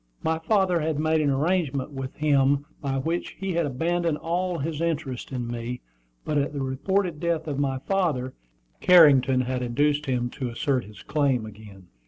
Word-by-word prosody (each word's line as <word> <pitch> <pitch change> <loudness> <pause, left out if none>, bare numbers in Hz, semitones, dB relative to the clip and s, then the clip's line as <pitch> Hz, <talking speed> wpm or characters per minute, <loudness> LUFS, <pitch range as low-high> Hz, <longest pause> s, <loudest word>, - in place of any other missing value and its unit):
My 160 0 0
father 190 -1 +2
had 155 -1 -1
made 155 +1 +2
an 145 - +2
arrangement 145 -1 0
with 135 -1 -6
him 140 -1 +2 0.2
by 135 -2 -1
which 165 +6 -3
he 195 -1 -2
had 170 -2 +1
abandoned 165 +4 0
all 175 +2 -1
his 155 +1 -3
interest 150 -8 -3
in 125 -2 -3
me, 120 +1 -5 0.4
but 150 -1 +1
at 140 +1 -1
the 140 -2 -2
reported 170 +6 -1
death 165 -1 -1
of 145 -2 -2
my 135 -2 0
father, 145 -6 -1 0.5
Carrington 140 -7 +6
had 130 0 -2
induced 145 +4 +1
him 120 -2 -1
to 130 -4 -4
assert 125 +2 -1
his 105 +1 -13
claim 135 -6 +1
again. 100 -3 -12
145 Hz, 175 wpm, -25 LUFS, 130-165 Hz, 0.5 s, Carrington